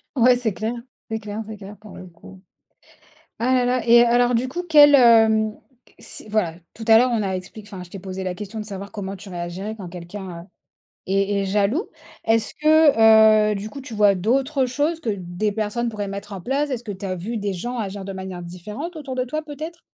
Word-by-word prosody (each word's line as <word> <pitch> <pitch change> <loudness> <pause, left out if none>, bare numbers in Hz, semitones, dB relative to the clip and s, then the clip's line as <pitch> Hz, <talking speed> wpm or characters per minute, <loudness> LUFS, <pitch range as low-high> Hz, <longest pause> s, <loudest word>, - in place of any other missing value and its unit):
Ouais, 250 -1 +5
c'est 240 -4 -2
clair. 220 +6 -3 0.4
C'est 220 0 -2
clair, 210 0 -6
c'est 220 -1 -8
clair, 200 +1 -11
pour 210 0 -13
le 185 - -10
coup. 180 +2 -15 1.0
Ah 250 +3 +1
là 250 -1 +3
là. 245 -1 0
Et, 235 0 +7
alors, 240 +1 +3
du 245 +3 0
coup, 345 +7 -4
quel, 295 -2 +8
hem 220 -4 +5 0.4
s - - -9
voilà, 205 -7 0 0.2
tout 225 - -8
à 225 - +8
l'heure 250 +2 +3
on 225 -2 +1
a 195 -1 -2
expliqué 200 +3 -10
enfin, 190 -3 -8
je 175 - -13
t'ai 195 - -8
posé 190 0 -6
la 185 -1 -3
question 210 +3 -7
de - - -5
savoir 200 -1 -8
comment 195 -2 -5
tu 200 +2 -12
réagirais 180 +4 -5
quand 190 -4 -8
quelqu'un, 175 0 -8
heu, - - -16 0.6
est 195 +1 +1
est - - -2
jaloux. 205 - 0 0.4
Est-ce 225 0 +1
que, 220 -9 +6
heu, - - -3
du 205 +2 -5
coup, 275 - -9
tu 260 -3 -10
vois 205 -2 +4
d'autres 260 +8 +1
choses 295 +6 -1
que 290 - -4
des 180 +3 -2
personnes 220 +3 -2
pourraient 210 -2 -4
mettre 200 +1 -7
en 190 - -7
place? 275 +7 -1
Est-ce 250 -3 -4
que 215 - -5
tu 195 0 -7
as 185 -1 -2
vu 210 +7 -4
des 200 -2 -2
gens 240 +8 -5
agir 200 -3 -4
de 195 - -6
manière 190 -1 -7
différente, 210 - -7
autour 275 -4 -6
de 255 0 -1
toi, 305 +5 -3
peut-être? 315 +3 -8
215 Hz, 225 wpm, -22 LUFS, 195-245 Hz, 1.0 s, quel